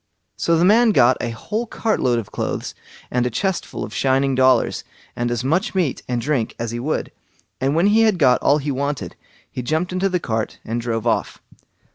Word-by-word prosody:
So 165 0 +1
the 170 - +3
man 220 +3 +5
got 125 -4 +5
a 120 - -2
whole 210 - -4
cart 220 0 -1
load 125 -2 +2
of 115 -4 -5
clothes, - - -3 0.4
and 125 0 +1
a - - -1
chest 190 - -2
full - - -6
of 105 - -7
shining 135 0 +1
dollars, 130 0 +3 0.3
and 120 0 -1
as 120 0 -2
much 165 +9 0
meat 170 -8 0
and 125 -1 -1
drink 130 -2 -1
as 115 -1 -3
he 120 - -4
would; 145 +6 -2 0.5
and 135 +3 0
when 170 +3 +3
he 210 +2 +4
had 215 -4 +3
got 130 -6 +4
all 145 - +4
he 145 0 -2
wanted, 140 - -3 0.4
he 125 - -4
jumped 160 +8 -1
into 190 +2 +1
the 180 -1 0
cart 110 -7 -3
and 115 +1 -2
drove 115 -1 -2
off. 115 -2 -1
135 Hz, 210 wpm, -21 LUFS, 120-180 Hz, 0.5 s, man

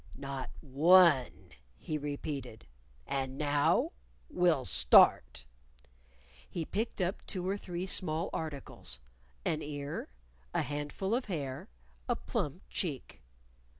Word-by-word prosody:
"Not 135 -1 -5
one," 155 -1 +4 0.3
he 155 - -4
repeated. 140 - -5 0.4
"And 135 -1 -2
now 145 -1 +2 0.4
we'll 170 -7 +3
start." 65 -1 +5 1.0
He 170 -3 -3
picked 220 +6 -3
up 185 +2 -1
two 185 -2 -4
or 195 - +1
three 180 -2 -5
small 170 -2 0
articles 140 - -5 0.5
an 155 - 0
ear, 145 - -5 0.5
a - - +2
handful 145 +8 -3
of 250 +2 +1
hair, 140 -9 -4 0.4
a - - +3
plump - - -3
cheek. - - -4
150 Hz, 110 wpm, -32 LUFS, 135-180 Hz, 1.0 s, start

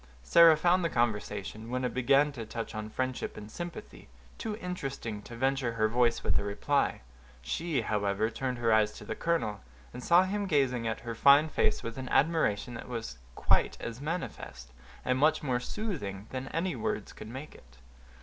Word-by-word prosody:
Sarah 165 - +7
found 175 +3 +3
the 165 - +1
conversation, 110 -2 -2
when 125 +1 -1
it 125 - -2
began 135 +4 +3
to 120 -5 -6
touch 115 +1 -6
on 110 0 -5
friendship 130 +2 -3
and 105 +1 -9
sympathy, 175 +3 -8 0.3
too 215 -2 -3
interesting 140 - -5
to 120 - -10
venture 130 -1 0
her 110 -1 +2
voice 120 +1 +2
with - - +2
a - - -3
reply. 105 - 0 0.4
She, 160 - -1
however, 105 0 0
turned 125 +2 -3
her 115 -2 +2
eyes 110 -1 +2
on - - -10
the - - -2
colonel, 160 - -1 0.3
and 125 +1 -7
saw 175 +2 +6
him 200 +2 -2
gazing 130 -8 +1
at 110 - -3
her 120 0 -5
fine 140 +6 +6
face 110 - +1
with 115 +2 -5
an 130 - -5
admiration 135 -7 +2
that 115 - -8
was 110 - -5 0.2
quite - - +2
as 120 +2 -6
manifest, 145 - -5 0.3
and 130 0 +1
much 155 +2 +3
more 125 -4 0
soothing, 125 - -4
than 130 0 -4
any 170 +4 -1
words 215 -1 -3
could - - -10
make 130 +6 -8
it. 65 0 -18
125 Hz, 185 wpm, -30 LUFS, 110-155 Hz, 0.4 s, Sarah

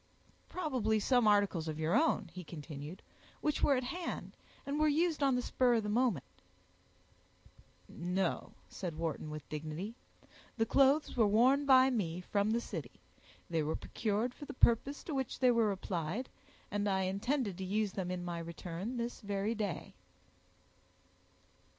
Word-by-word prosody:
"Probably 255 - 0
some 245 +1 +3
articles 200 -6 +3
of 155 -1 -3
your 160 +2 +1
own," 315 +5 +2
he 185 - -7
continued, 155 +1 -8 0.4
"which 300 -1 0
were 280 - +5
at 255 - 0
hand, 345 +8 -5 0.3
and 280 +2 -2
were 310 - +4
used 315 +1 +2
on 270 -2 +4
the 250 - 0
spur 245 -1 +3
of 225 - +1
the 210 - -2
moment." 220 - +1 1.6
"No," 180 +2 -2
said 175 -4 -5
Wharton, 160 -1 -3
with 150 0 -7
dignity, 155 +7 -5 0.6
"the 225 - +3
clothes 275 +5 +3
were 225 -4 +4
worn 255 +7 +4
by 260 0 +7
me 180 -8 -1
from 200 +3 0
the 230 +2 +1
city; - - -7 0.5
they 165 -3 0
were 155 +1 -1
procured 225 +3 -1
for 290 - -9
the 285 - -8
purpose 255 +4 +3
to 320 - -5
which 265 -2 -2
they 255 -1 +5
were 230 -3 +3
applied, 185 +4 -3 0.4
and 205 0 0
I 190 -1 +1
intended 200 +3 -1
to - - -3
use 205 +2 0
them 185 -2 -3
in 180 -1 -3
my 170 -1 -3
return 170 +7 -5
this 235 +1 -3
very 205 +1 -1
day." 210 -5 -3
210 Hz, 160 wpm, -34 LUFS, 180-255 Hz, 1.6 s, by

